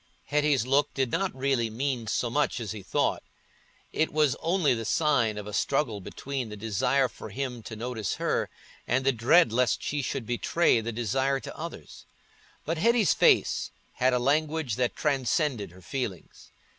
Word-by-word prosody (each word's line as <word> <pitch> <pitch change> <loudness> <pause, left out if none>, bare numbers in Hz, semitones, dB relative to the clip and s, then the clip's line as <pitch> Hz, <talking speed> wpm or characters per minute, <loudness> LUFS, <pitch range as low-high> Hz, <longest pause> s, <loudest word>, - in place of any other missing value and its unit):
Hetty's 145 -4 +2
look 140 +3 +2
did 130 -3 0
not 195 +6 0
really 130 -4 0
mean 120 0 -2
so 120 +1 -1
much 145 -1 0
as 110 -4 -4
he 110 -2 -6
thought: 95 - 0 0.7
it 160 - +1
was 150 -4 +2
only 165 -5 +2
the 115 -1 -3
sign 120 -5 +1
of 105 - -5
a 105 - -7
struggle 120 -7 0
between 130 +5 -5
the 105 - -8
desire 125 +6 +1
for - - -10
him 130 -3 -4
to 110 - -8
notice 110 -3 -3
her - - -1 0.4
and 130 +2 +1
the 135 - +5
dread 120 +3 +4
lest 125 -1 +1
she 145 0 -1
should 130 -1 -3
betray 120 +3 +2
the 115 +1 -4
desire 130 +5 0
to - - -8
others. - - -9 0.6
But 160 +1 -2
Hetty's 230 +1 +4
face - - +3 0.2
had 130 +1 +2
a 125 - +2
language 145 -1 0
that 125 0 0
transcended 135 - 0
her 90 +2 -16
feelings. 110 - -6
130 Hz, 170 wpm, -27 LUFS, 115-145 Hz, 0.7 s, the